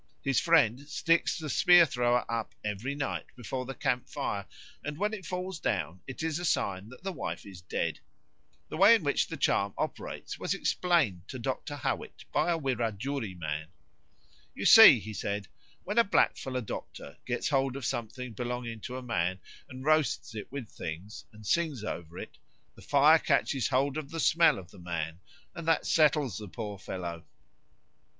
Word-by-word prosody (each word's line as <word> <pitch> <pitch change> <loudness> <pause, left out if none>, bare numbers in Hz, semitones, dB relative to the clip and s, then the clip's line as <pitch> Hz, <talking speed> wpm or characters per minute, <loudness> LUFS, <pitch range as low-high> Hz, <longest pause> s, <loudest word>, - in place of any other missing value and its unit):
His 135 -2 +2
friend 145 -9 +4
sticks 165 +3 +2
the 160 - -5
spear 175 +3 +6
thrower 125 -3 +1
up 115 -1 -3
every 105 +7 -3
night 140 -2 -3
before 125 +1 -5
the 135 - -5
camp 125 -3 -1
fire, - - -3 0.4
and 150 0 -5
when 210 +4 0
it 190 -5 -6
falls 180 -1 -4
down 95 - -2
it 135 +4 -6
is 160 0 -1
a - - -5
sign 100 - -1
that 125 +7 -14
the 195 - -2
wife - - -5
is 95 -3 -11
dead. 85 -2 -2 0.7
The - - -5
way 200 +6 +8
in 210 - -1
which 140 -1 +1
the - - -6
charm 100 0 +1
operates - - -4
was - - -1
explained 130 - +1
to 130 - -6
Dr. 135 +4 -3
Howitt 145 - -4
by - - +2
a 170 - +1
Wirajuri 120 - -2
man. 80 -2 -4 0.9
"You - - -4
see," - - +10
he 110 +3 -7
said, 100 -1 -3 0.4
"when 205 +5 +1
a - - +7
blackfellow 130 - +1
doctor 70 - -7
gets 125 -1 -1
hold 135 -2 +1
of 140 -3 -5
something 120 +1 -4
belonging 120 0 -4
to 125 +4 -6
a 130 - -7
man 95 -7 -1 0.3
and 130 +1 -9
roasts 155 -8 +2
it 105 0 -7
with 135 -4 -5
things, 90 +4 -7
and 105 -1 -14
sings 155 -3 0
over 85 -4 -6
it, - - -9 0.3
the - - -16
fire 150 +3 +5
catches 135 -6 +1
hold 135 +2 +1
of 150 -3 -5
the 165 - -5
smell 165 +2 +4
of 90 -3 -10
the - - -14
man, 85 -1 -4 0.3
and 165 -1 -7
that 165 - +2
settles 145 - +3
the 105 - -7
poor 105 0 -6
fellow." 85 -4 -6
125 Hz, 180 wpm, -30 LUFS, 105-155 Hz, 0.9 s, see